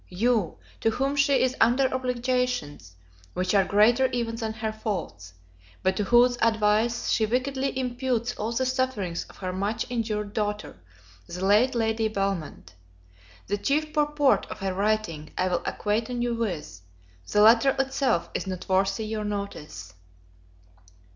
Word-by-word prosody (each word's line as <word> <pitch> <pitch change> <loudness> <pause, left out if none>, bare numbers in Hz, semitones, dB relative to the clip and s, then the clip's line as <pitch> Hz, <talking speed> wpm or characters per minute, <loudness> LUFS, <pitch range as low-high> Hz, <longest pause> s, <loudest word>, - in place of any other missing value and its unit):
you, 215 -1 0 0.2
to 225 - +2
whom 270 +5 -1
she 280 -1 +3
is 255 0 +1
under 245 +4 +4
obligations 250 - -2 0.4
which 185 +1 0
are 200 -1 +5
greater 230 +7 +4
even 235 -2 -2
than 225 -1 -3
her 220 0 -3
faults, 200 - -5 0.5
but 190 0 +2
to 210 - 0
whose 245 +2 +4
advice 220 +1 +2
she 220 - +2
wickedly 265 +4 -1
imputes 245 -1 -1
all 220 0 -3
the 260 +2 0
sufferings 255 -9 -1
of - - -17
her 185 -1 -4
much 200 +4 -2
injured 215 -3 -2
daughter, 210 -1 -3 0.5
the 180 +2 -4
late 225 +6 +4
Lady 225 -1 +1
Belmont. 195 - -3 0.7
The 205 +1 -2
chief 305 +6 0
purport 295 -2 +2
of - - -7
her 195 -1 -2
writing 200 -6 -1
I 185 - +1
will 175 -1 0
acquaint 215 +2 -1
you 240 -1 -1
with; 175 - -4 0.5
the 210 - +4
letter 235 +5 +6
itself 270 -8 0
is - - -3
not 185 -1 -5
worthy 195 +3 +1
your 215 0 -3
notice. 200 - -6
220 Hz, 145 wpm, -26 LUFS, 195-250 Hz, 0.7 s, letter